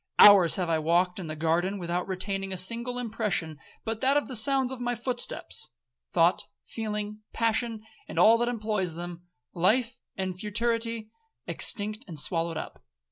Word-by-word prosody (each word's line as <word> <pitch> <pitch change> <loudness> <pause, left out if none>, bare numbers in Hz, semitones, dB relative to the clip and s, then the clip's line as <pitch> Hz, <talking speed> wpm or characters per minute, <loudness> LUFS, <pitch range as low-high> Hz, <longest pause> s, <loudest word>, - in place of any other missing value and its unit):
Hours 195 -5 +9
have 180 -2 0
I 165 -1 +1
walked 175 +4 +2
in 175 - -5
the 155 - -5
garden, 170 +5 0
without 175 -1 -2
retaining 195 +1 -3
a 190 - -3
single 235 +6 0
impression 210 - -2 0.3
but 225 -1 -3
that 270 +2 +4
of 290 - 0
the 260 - -4
sounds 265 +3 +3
of 260 -2 -6
my 245 0 -1
footsteps;—thought, - - -2 0.2
feeling, 210 -1 -4
passion, 230 -1 0 0.2
and - - -8
all 225 +1 +6
that 240 - +1
employs 210 -7 -2
them,—life 175 - -2 0.2
and 190 -1 -2
futurity, 230 +1 -1 0.3
extinct 215 +3 -1
and 160 -3 -7
swallowed 165 +1 -1
up. - - -7
205 Hz, 150 wpm, -28 LUFS, 175-230 Hz, 0.3 s, Hours